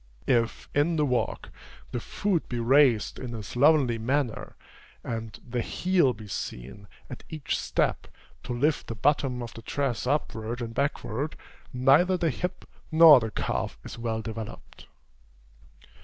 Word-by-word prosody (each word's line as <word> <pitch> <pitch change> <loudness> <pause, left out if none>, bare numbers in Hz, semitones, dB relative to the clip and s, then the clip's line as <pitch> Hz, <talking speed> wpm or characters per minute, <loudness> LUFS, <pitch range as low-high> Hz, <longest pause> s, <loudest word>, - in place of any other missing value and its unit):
If, 115 -3 +1
in 150 +4 +2
the 150 -2 +2
walk, 125 -3 -1 0.4
the 120 - -2
foot 185 - -1
be 120 - -2
raised 125 -2 +3
in 120 -2 -6
a 110 - -6
slovenly 130 0 +3
manner, 130 +1 -2 0.5
and 115 -1 -5
the 120 0 -2
heel 180 -1 +2
be 110 -1 -11
seen, 80 +1 -6 0.2
at - - -9
each 155 -3 -3
step, - - -1 0.3
to - - -7
lift 145 +6 0
the 115 - -5
bottom 130 0 +1
of 115 - -8
the 115 - -10
dress 130 -1 -2
upward 120 -4 -2
and 115 -2 -5
backward, 140 +1 -2 0.4
neither 140 +9 +4
the 165 -3 +1
hip 180 +6 -5 0.2
nor 160 -3 +9
the 110 -1 -3
calf - - -3
is - - -9
well 110 -1 -2
developed. 110 -1 -8
125 Hz, 145 wpm, -27 LUFS, 115-145 Hz, 0.5 s, nor